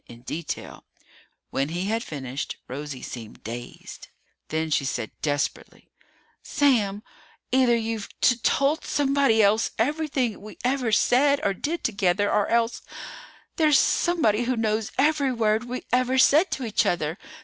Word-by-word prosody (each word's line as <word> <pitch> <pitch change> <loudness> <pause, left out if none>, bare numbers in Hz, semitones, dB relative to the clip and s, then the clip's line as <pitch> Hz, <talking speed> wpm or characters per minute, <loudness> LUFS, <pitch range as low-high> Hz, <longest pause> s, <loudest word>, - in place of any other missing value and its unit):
In 120 0 -13
detail. 160 +4 -6 0.7
When 135 +2 -1
he 175 +3 -3
had 225 +3 -1
finished, 135 -2 -5
Rosie 140 0 -6
seemed 115 -3 -9
dazed. 120 +3 -8 0.4
Then 160 0 -2
she 145 - +2
said 130 -5 -3
desperately, 145 -2 -3 0.5
"Sam! 220 -8 +1 0.5
Either 255 -2 +4
you've 225 -2 -3
t 245 - +4
told 280 +6 +1
somebody 275 -6 +2
else 210 +3 +3
everything 265 -4 -1
we 210 +1 -11
ever 250 -2 0
said 280 +6 +3
or 200 - +1
did 315 - -3
together, 200 -2 +1
or 205 - +2
else 235 0 +1 0.8
there's 305 -3 +5
somebody 245 - +2
who 255 +1 0
knows 220 -1 -1
every 285 -1 +2
word 220 -1 +1
we 250 +1 -5
ever 255 +1 +2
said 300 +7 +5
to 260 - -3
each 220 - +1
other! 165 +1 -1
225 Hz, 140 wpm, -25 LUFS, 175-265 Hz, 0.8 s, there's